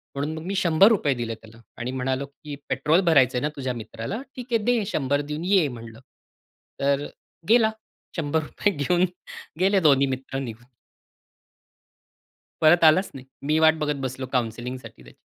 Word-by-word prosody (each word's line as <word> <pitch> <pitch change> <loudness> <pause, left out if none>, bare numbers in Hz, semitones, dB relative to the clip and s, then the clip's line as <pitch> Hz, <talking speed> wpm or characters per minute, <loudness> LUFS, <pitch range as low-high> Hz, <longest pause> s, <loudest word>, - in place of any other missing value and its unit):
म्हणून 145 +3 -2
मग 160 - -7
मी 195 +2 -3
₹100 185 -2 +4
दिले 120 -2 -4
त्याला. 110 +1 -17 0.2
आणि 125 +2 -4
म्हणालो 130 +1 -2
की 145 +1 -10
"पेट्रोल 150 +7 +2
भरायचंय 130 -4 +4
ना 150 - 0
तुझ्या 130 -2 -2
मित्राला? 115 - -6
ठीक 250 -1 -7
आहे, 230 -2 +1
दे 240 -1 +2
100 145 -7 0
देऊन 150 +3 -5
ये," 185 -5 +3
म्हणलं. 115 -3 -9 0.8
तर 140 +1 +1 0.4
गेला 225 -1 +5 0.5
₹100 160 +5 -1
घेऊन. 175 +5 +2 0.5
गेले 195 +1 +3
दोन्ही 140 -4 +4
मित्र 135 0 -4
निघून. 120 -3 -7 2.0
परत 165 +2 +5
आलाच 165 +5 +5
नाही. 130 -1 -10 0.2
मी 155 +1 +2
वाट 160 0 +6
बघत 150 -1 -1
बसलो 130 +1 -6
काउन्सिलिंगसाठी 125 +1 -4
त्याची. - - -16
145 Hz, 150 wpm, -24 LUFS, 130-170 Hz, 2.0 s, वाट